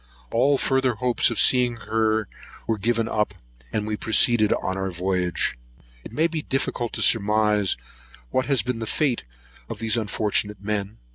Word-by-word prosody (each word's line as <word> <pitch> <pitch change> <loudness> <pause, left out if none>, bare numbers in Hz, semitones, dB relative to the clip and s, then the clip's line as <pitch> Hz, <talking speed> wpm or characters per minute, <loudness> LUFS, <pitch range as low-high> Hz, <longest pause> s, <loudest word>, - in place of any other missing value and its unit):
All 135 +5 +3
further 130 -2 +1
hopes 125 +1 +2
of 115 - -3
seeing 125 -2 +4
her 110 -1 0 0.4
were 110 -2 -1
given 115 +2 0
up, 105 -2 -1 0.4
and 105 - -1
we 110 0 -2
proceeded 110 0 +3
on 95 - -1
our 95 0 -2
voyage. 90 0 -1 0.5
It - - -10
may 155 +8 +1
be 165 -2 -1
difficult 130 -4 -2
to - - -1
surmise 105 -2 +2 0.5
what 130 - 0
has 135 -3 +2
been 125 -2 -3
the 115 - -4
fate 135 -2 0 0.5
of - - -5
these 115 0 +1
unfortunate 105 -2 0
men. 100 +1 -3
110 Hz, 160 wpm, -24 LUFS, 105-120 Hz, 0.5 s, seeing